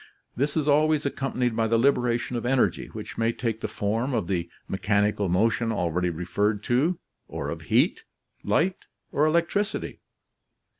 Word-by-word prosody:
This 140 Hz, +5 st, 0 dB
is 150 Hz, -2 st, 0 dB
always 150 Hz, 0 st, +3 dB
accompanied 125 Hz, -4 st, -1 dB
by 115 Hz, 0 st, +1 dB
the 115 Hz, +1 st, +3 dB
liberation 125 Hz, -1 st, +1 dB
of 120 Hz, -, -2 dB
energy, 125 Hz, +1 st, +1 dB
which -, -, -8 dB
may 115 Hz, 0 st, +2 dB
take 115 Hz, -2 st, -3 dB
the -, -, -1 dB
form 115 Hz, +6 st, -1 dB
of 110 Hz, -6 st, 0 dB
the 85 Hz, -2 st, -2 dB, 0.2 s
mechanical 105 Hz, 0 st, +1 dB
motion 115 Hz, +5 st, +2 dB
already 90 Hz, -3 st, 0 dB
referred 100 Hz, +5 st, -1 dB
to, 145 Hz, +10 st, +1 dB, 0.3 s
or -, -, -4 dB
of -, -, -5 dB
heat, -, -, +3 dB, 0.4 s
light, 180 Hz, +4 st, 0 dB, 0.2 s
or 150 Hz, +2 st, +3 dB
electricity. 170 Hz, +6 st, 0 dB
115 Hz, 150 wpm, -26 LUFS, 105-140 Hz, 0.4 s, always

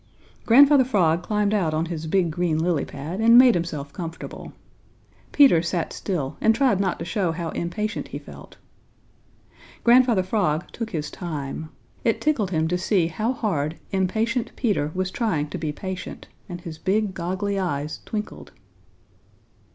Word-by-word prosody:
Grandfather 275 Hz, +3 st, +7 dB
Frog 180 Hz, -9 st, +2 dB
climbed 210 Hz, +2 st, 0 dB
out 170 Hz, -7 st, +1 dB
on 160 Hz, +1 st, 0 dB
his 165 Hz, -2 st, -5 dB
big 175 Hz, 0 st, +1 dB
green 170 Hz, -1 st, 0 dB
lily 165 Hz, -2 st, +1 dB
pad 155 Hz, +8 st, -6 dB
and 230 Hz, +1 st, +6 dB
made 250 Hz, -1 st, +8 dB
himself 155 Hz, -5 st, -3 dB
comfortable. 165 Hz, -2 st, -7 dB, 0.8 s
Peter 270 Hz, -, +6 dB
sat 170 Hz, -1 st, -2 dB
still 155 Hz, -9 st, -3 dB
and 225 Hz, 0 st, +4 dB
tried 255 Hz, -8 st, +2 dB
not 190 Hz, -2 st, 0 dB
to 165 Hz, -, -6 dB
show 180 Hz, -1 st, 0 dB
how 165 Hz, 0 st, -4 dB
impatient 210 Hz, +7 st, -3 dB
he -, -, -6 dB
felt. -, -, -13 dB, 1.3 s
Grandfather 240 Hz, -5 st, +5 dB
Frog 180 Hz, -5 st, 0 dB
took 230 Hz, -2 st, -5 dB
his 155 Hz, -7 st, -4 dB
time. 155 Hz, -2 st, -5 dB, 0.3 s
It 230 Hz, -, +1 dB
tickled 270 Hz, -11 st, +1 dB
him 160 Hz, -3 st, 0 dB
to 180 Hz, +1 st, 0 dB
see 185 Hz, -2 st, +2 dB
how 215 Hz, +8 st, -1 dB
hard 165 Hz, -, -1 dB, 0.2 s
impatient 220 Hz, +6 st, 0 dB
Peter 205 Hz, -, 0 dB
was 185 Hz, 0 st, -1 dB
trying 165 Hz, -12 st, -1 dB
to -, -, -5 dB
be 155 Hz, -1 st, -2 dB
patient, 185 Hz, +4 st, -7 dB, 0.2 s
and 175 Hz, -1 st, -6 dB
his 160 Hz, -2 st, -8 dB
big, 205 Hz, +1 st, 0 dB
goggly 190 Hz, +3 st, -2 dB
eyes 150 Hz, -4 st, -3 dB
twinkled. 215 Hz, -1 st, -6 dB
185 Hz, 155 wpm, -24 LUFS, 160-215 Hz, 1.3 s, made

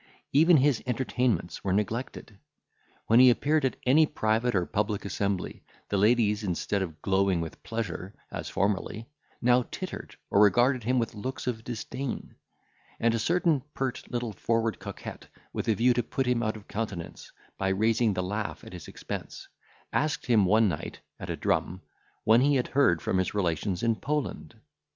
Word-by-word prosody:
Even 160 Hz, +4 st, +6 dB
his 135 Hz, -3 st, +3 dB
entertainments 125 Hz, -5 st, -1 dB
were 95 Hz, -, 0 dB
neglected; 105 Hz, 0 st, -3 dB, 0.7 s
when 115 Hz, +2 st, +5 dB
he 130 Hz, 0 st, +9 dB
appeared 150 Hz, +5 st, +2 dB
at 130 Hz, -, +1 dB
any 150 Hz, +5 st, +5 dB
private 110 Hz, -3 st, 0 dB
or 90 Hz, -2 st, +2 dB
public 105 Hz, 0 st, -1 dB
assembly, 100 Hz, -1 st, -2 dB, 0.3 s
the 100 Hz, -, +1 dB
ladies, 105 Hz, 0 st, +3 dB
instead 100 Hz, +1 st, -1 dB
of 80 Hz, -4 st, -6 dB
glowing 95 Hz, -2 st, +2 dB
with 80 Hz, -1 st, -6 dB
pleasure, 100 Hz, -2 st, -5 dB, 0.2 s
as -, -, -5 dB
formerly, 100 Hz, +3 st, -1 dB, 0.4 s
now 125 Hz, +1 st, +5 dB
tittered -, -, -6 dB, 0.2 s
or 100 Hz, -, +5 dB
regarded 120 Hz, +5 st, +4 dB
him 130 Hz, +2 st, +2 dB
with 115 Hz, -2 st, 0 dB
looks 120 Hz, +5 st, -5 dB
of 115 Hz, -3 st, -3 dB
disdain; 125 Hz, +3 st, -5 dB, 0.7 s
and 115 Hz, 0 st, +2 dB
a 115 Hz, -, 0 dB
certain 165 Hz, +1 st, +2 dB
pert, 130 Hz, -2 st, -2 dB
little, 120 Hz, -3 st, -3 dB
forward 115 Hz, +1 st, 0 dB
coquette, -, -, -8 dB, 0.3 s
with -, -, -3 dB
a 110 Hz, -, +3 dB
view 120 Hz, +4 st, +4 dB
to 120 Hz, -, +1 dB
put 135 Hz, +3 st, -2 dB
him 125 Hz, -1 st, +1 dB
out 110 Hz, -1 st, -1 dB
of 105 Hz, -, -15 dB
countenance, 100 Hz, -6 st, -5 dB, 0.3 s
by 95 Hz, -, +1 dB
raising 110 Hz, +3 st, +2 dB
the 90 Hz, -, -1 dB
laugh 105 Hz, +3 st, -4 dB
at -, -, -11 dB
his 90 Hz, -3 st, -9 dB
expense, -, -, -7 dB, 0.5 s
asked 150 Hz, 0 st, 0 dB
him 115 Hz, -5 st, +4 dB
one 110 Hz, +4 st, +4 dB
night, 80 Hz, -6 st, -4 dB, 0.2 s
at -, -, -7 dB
a -, -, -1 dB
drum, 90 Hz, +2 st, 0 dB, 0.4 s
when 115 Hz, +3 st, +5 dB
he 145 Hz, +2 st, +4 dB
had 125 Hz, -, 0 dB
heard 130 Hz, -, +3 dB
from 95 Hz, -, +1 dB
his 95 Hz, -, -1 dB
relations 90 Hz, 0 st, -1 dB
in 115 Hz, -1 st, +3 dB
Poland? 145 Hz, +7 st, -3 dB
110 Hz, 170 wpm, -28 LUFS, 100-125 Hz, 0.7 s, he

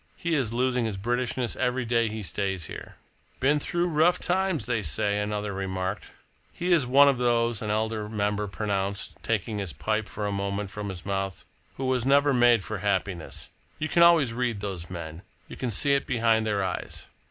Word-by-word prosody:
"He 170 Hz, -1 st, -2 dB
is 135 Hz, -8 st, +1 dB
losing 125 Hz, 0 st, +1 dB
his 105 Hz, -3 st, -3 dB
Britishness 120 Hz, +3 st, -1 dB
every 125 Hz, -1 st, 0 dB
day 115 Hz, 0 st, +2 dB
he 110 Hz, 0 st, -5 dB
stays 95 Hz, 0 st, -2 dB
here." -, -, -9 dB, 0.4 s
"Been 145 Hz, +3 st, +3 dB
through 175 Hz, +4 st, 0 dB
rough 165 Hz, +2 st, +3 dB
times, 185 Hz, -, 0 dB
they 120 Hz, -3 st, 0 dB
say," 100 Hz, +5 st, 0 dB
another 105 Hz, 0 st, -2 dB
remarked. 95 Hz, +1 st, -3 dB, 0.4 s
"He 180 Hz, +1 st, -2 dB
is 160 Hz, -7 st, +4 dB
one 140 Hz, +3 st, +7 dB
of 135 Hz, -3 st, +3 dB
those," 120 Hz, -2 st, +1 dB
an 105 Hz, -, -3 dB
elder 110 Hz, 0 st, -1 dB
member 105 Hz, -1 st, -1 dB
pronounced, 100 Hz, 0 st, -2 dB
taking 110 Hz, -1 st, -1 dB
his 95 Hz, -6 st, -4 dB
pipe 110 Hz, +9 st, -1 dB
for 105 Hz, -, -5 dB
a 100 Hz, -, -1 dB
moment 100 Hz, 0 st, -2 dB
from 105 Hz, 0 st, -5 dB
his 90 Hz, -3 st, -8 dB
mouth, 95 Hz, -1 st, -3 dB, 0.3 s
"who 135 Hz, -, -3 dB
was 130 Hz, -2 st, +1 dB
never 140 Hz, +2 st, +4 dB
made 120 Hz, -4 st, +5 dB
for 105 Hz, +3 st, -4 dB
happiness. 95 Hz, -4 st, -2 dB, 0.3 s
You 155 Hz, -, -3 dB
can 170 Hz, -, +3 dB
always 165 Hz, -8 st, +6 dB
read 120 Hz, -3 st, -1 dB
those 95 Hz, -4 st, -5 dB
men. 85 Hz, -2 st, -7 dB, 0.3 s
You -, -, -9 dB
can 125 Hz, -, -3 dB
see 140 Hz, +6 st, +3 dB
it 140 Hz, -, +1 dB
behind 115 Hz, -2 st, +2 dB
their 100 Hz, -2 st, 0 dB
eyes." 95 Hz, -, -4 dB
110 Hz, 190 wpm, -27 LUFS, 100-125 Hz, 0.4 s, one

